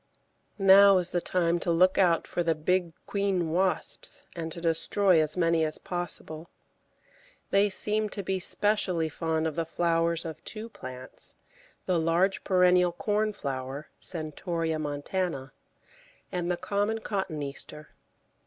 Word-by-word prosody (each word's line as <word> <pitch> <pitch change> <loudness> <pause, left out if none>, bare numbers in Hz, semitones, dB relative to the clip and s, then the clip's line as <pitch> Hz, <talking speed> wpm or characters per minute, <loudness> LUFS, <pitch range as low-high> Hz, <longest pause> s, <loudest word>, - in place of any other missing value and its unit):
Now 195 0 +7
is 180 -1 -1
the 175 - 0
time 170 -1 +1
to 175 - -3
look 180 +3 +4
out 175 -3 +3
for 175 - -2
the 165 -1 +1
big 175 +2 0
queen 195 -5 0
wasps 185 +2 0
and 165 -1 -4
to 170 - -7
destroy 170 +2 +2
as 155 +2 0
many 165 -2 +2
as 155 0 -1
possible. 175 -2 -5 1.0
They 200 +1 +4
seem 210 +2 0
to 200 - -5
be 190 +1 -1
specially 185 -4 +1
fond 160 0 -1
of 160 - -1
the 165 - 0
flowers 165 0 0
of 160 -2 -7
two 220 +1 -7
plants, 130 - -9 0.5
the 180 -2 +1
large 170 +4 +1
perennial 180 -2 +4
Cornflower 150 -10 -2
(Centaurea 160 0 -3
montana) 145 0 -3 0.8
and 175 -1 -2
the 180 - 0
common 205 +4 -1
Cotoneaster. 150 -6 -5
175 Hz, 135 wpm, -28 LUFS, 160-190 Hz, 1.0 s, Now